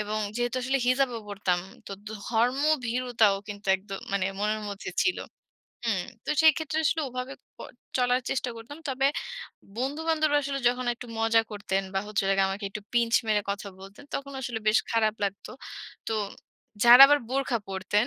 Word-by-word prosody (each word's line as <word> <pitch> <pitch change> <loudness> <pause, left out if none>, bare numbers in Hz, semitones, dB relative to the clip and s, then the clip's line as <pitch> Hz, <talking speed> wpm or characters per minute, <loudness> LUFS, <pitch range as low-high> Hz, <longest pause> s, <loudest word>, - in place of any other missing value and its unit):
এবং 210 +1 -2 0.2
যেহেতু 245 +1 -1
আসলে 265 +2 +1
হিজাব 260 +2 +3
ও - - -3
পড়তাম 195 -3 0 0.3
তো - - -6 0.2
ধর্মভীরুতাও 245 0 +1
কিন্তু 205 0 -8
একদ 195 +2 -21 0.2
মানে 200 -2 +1
মনের 215 +1 0
মধ্যে 200 0 -6
ছিলো। 365 - 0 0.6
হুম 200 -6 +1 0.2
তো - - -3
সেই 315 -1 +8
ক্ষেত্রে 315 -1 -2
আসলে 320 +2 +2
ওভাবে 255 +1 -5 0.2
ক - - -65 0.4
চলার 250 0 +2
চেষ্টা 255 -2 -1
করতাম। 230 +7 -10
তবে 270 0 +1 0.7
বন্ধু-বান্ধবরা 310 +3 +1
আসলে 275 0 -3
যখন 250 +1 -2
একটু 245 +1 -10
মজা 225 0 +4
করতেন 200 -2 -2
বা 195 - +2
হচ্ছে 210 0 -1
হলো 195 - +2
গিয়ে 195 0 +4
আমাকে 200 +2 -5
একটু 210 +1 -7
পিঞ্চ 235 -1 +2
মেরে 210 -1 +2
কথা 200 0 -4
বলতেন 195 +7 -12
তখন 280 0 -4
আসলে 240 -3 -3
বেশ 215 - +5
খারাপ 220 -2 +2
লাগতো। 200 0 -4 0.6
তো - - -1 0.7
যারা 240 +2 +11
আবার 290 0 +5
বোরখা 265 -2 0
পড়তেন, 195 +4 0
235 Hz, 170 wpm, -27 LUFS, 205-265 Hz, 0.7 s, যারা